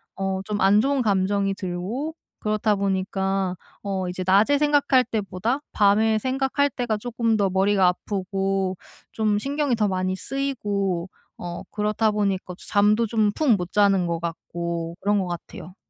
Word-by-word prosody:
어 195 -1 -2
좀 210 0 -2
안 195 +2 +5
좋은 275 0 +1
감정이 200 -2 +1
들고 200 - -4 0.2
그렇다 215 0 +1
보니까 195 -1 -1 0.3
어 190 -2 -2
이제 185 +1 -4
낮에 205 +10 +4
생각할 285 -3 +4
때보다 220 +3 -2
밤에 215 +2 +3
생각할 270 +3 0
때가 240 -4 -2
쪼끔 230 0 0
더 200 -2 +2
머리가 190 0 +3
아프고 195 0 -1 0.4
좀 215 -2 +1
신경이 280 +2 -1
더 215 -2 +1
많이 185 0 -1
쓰이고 200 -9 -2 0.3
어 175 0 -6
그렇다 210 +1 +1
보니까 200 -3 -1
잠도 210 +3 +3
좀 215 -2 +2
푹 305 +3 0
못 180 -1 -5
자는 200 -3 +3
것 170 -1 -1
같고 170 0 -4
그런 205 +1 +2
것 190 - -1
같아요. 175 0 -8
200 Hz, 285 characters per minute, -24 LUFS, 190-225 Hz, 0.4 s, 안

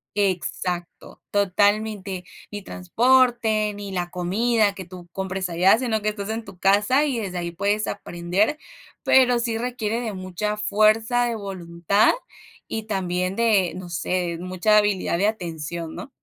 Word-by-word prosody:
exacto, 180 -2 -2
totalmente. 205 -1 +1 0.3
Ni 205 -1 -6
transporte 220 +1 +2
ni 200 -1 -7
la 175 -2 -2
comida 205 +4 +1
que 190 - -8
tú 180 -1 -11
compres 190 -1 -3
allá, 185 +5 +5
sino 230 -4 -1
que 215 - 0
estás 205 0 -5
en 225 +1 -3
tu 195 -2 -12
casa 205 +10 +3
y 260 -5 -1
desde 185 -4 -4
ahí 170 -1 -3
puedes 200 +4 0
aprender, 195 - -1 0.5
pero 250 -2 +5
sí 230 -1 -1
requiere 240 -2 -2
de 220 -4 -4
mucha 185 +3 -3
fuerza 220 +3 +3
de 235 -1 -1
voluntad 190 -1 +1 0.6
y 220 -1 -4
también 185 -2 -2
de, 210 -6 +3
no 185 -1 -7
sé, 170 +1 -2
mucha 185 +4 +2
habilidad 205 -4 +1
de 205 - +3
atención, 170 -5 -4
¿no? - - -8
200 Hz, 150 wpm, -23 LUFS, 180-220 Hz, 0.6 s, allá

